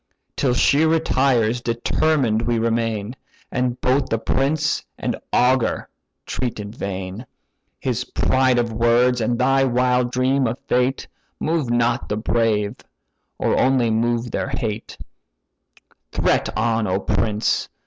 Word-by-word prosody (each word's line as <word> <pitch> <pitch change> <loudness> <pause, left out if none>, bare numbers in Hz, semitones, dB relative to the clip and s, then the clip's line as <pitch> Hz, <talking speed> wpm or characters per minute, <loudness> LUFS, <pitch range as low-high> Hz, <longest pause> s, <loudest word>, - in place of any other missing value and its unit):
Till 125 -3 +1
she 140 +4 +3
retires, 130 -7 +2
determined 120 0 +1
we 120 0 0
remain, 115 -1 -1 0.4
And 125 -1 -1
both 130 +2 +2
the 115 - +1
prince 140 +6 0
and - - -2 0.2
augur 125 -1 +2 0.4
threat 125 -4 -3
in 100 0 -6
vain: 100 +1 -6 0.5
His 125 -1 -1
pride 130 -1 +1
of 120 -2 0
words, 120 +2 +3
and 120 +2 0
thy 135 +2 +3
wild 125 -1 +1
dream 130 +1 +1
of 115 +2 -3
fate, 125 +2 +1 0.3
Move 155 -5 -1
not 120 +1 +1
the 105 - -1
brave, 110 -1 0 0.6
or - - +1
only 130 -3 +3
move 120 +1 0
their - - -2
hate, 115 -5 -4 1.1
Threat - - +1
on, 115 -1 +1
O 95 +1 0
prince! 105 +2 0
120 Hz, 130 wpm, -21 LUFS, 115-130 Hz, 1.1 s, she